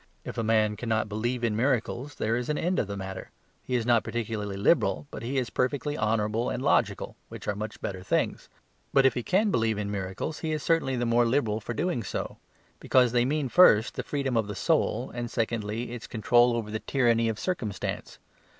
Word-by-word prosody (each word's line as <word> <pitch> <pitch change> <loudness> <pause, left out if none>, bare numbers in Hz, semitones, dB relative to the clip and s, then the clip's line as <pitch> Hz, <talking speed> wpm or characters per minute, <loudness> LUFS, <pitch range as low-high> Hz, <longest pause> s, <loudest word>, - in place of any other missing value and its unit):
If - - -6
a - - 0
man 110 -1 +2
cannot 110 -2 0
believe 120 +4 -2
in 115 -2 +1
miracles 125 +2 -1
there 110 +2 0
is 125 +2 -3
an 150 - 0
end 180 +2 0
of - - 0
the 100 0 -5
matter; 95 -1 -6 0.3
he 125 - -3
is 120 -2 0
not 120 -2 +3
particularly 105 -4 -3
liberal, 105 - +2
but - - -7
he 130 +4 -3
is 125 -3 -1
perfectly 145 +3 -1
honourable 110 +1 0
and - - -3
logical, - - +1
which - - -9
are 105 - +1
much 105 +2 -6
better 95 -2 -4
things. 95 - -1 0.4
But 135 -1 +5
if 135 - +5
he 125 - -2
can 200 - +2
believe 110 - +1
in 105 -1 -3
miracles, 100 +9 -4
he 160 -1 -2
is 150 -2 -3
certainly 165 -6 +1
the 120 -1 -1
more 120 0 +3
liberal 115 -4 +1
for 120 +2 -5
doing 170 -2 -1
so; - - -5 0.4
because 125 -2 +3
they 120 0 +3
mean 145 +1 0
first, 120 -7 +6
the - - -3
freedom 140 -3 -2
of 110 -2 +1
the 105 - -5
soul, - - 0
and 120 -1 -4
secondly, 115 0 -2
its 120 -2 -7
control 120 +2 +3
over 110 -2 -3
the 110 - -2
tyranny 115 -4 +2
of 110 - -3
circumstance. 110 - -3
115 Hz, 210 wpm, -27 LUFS, 110-130 Hz, 0.4 s, first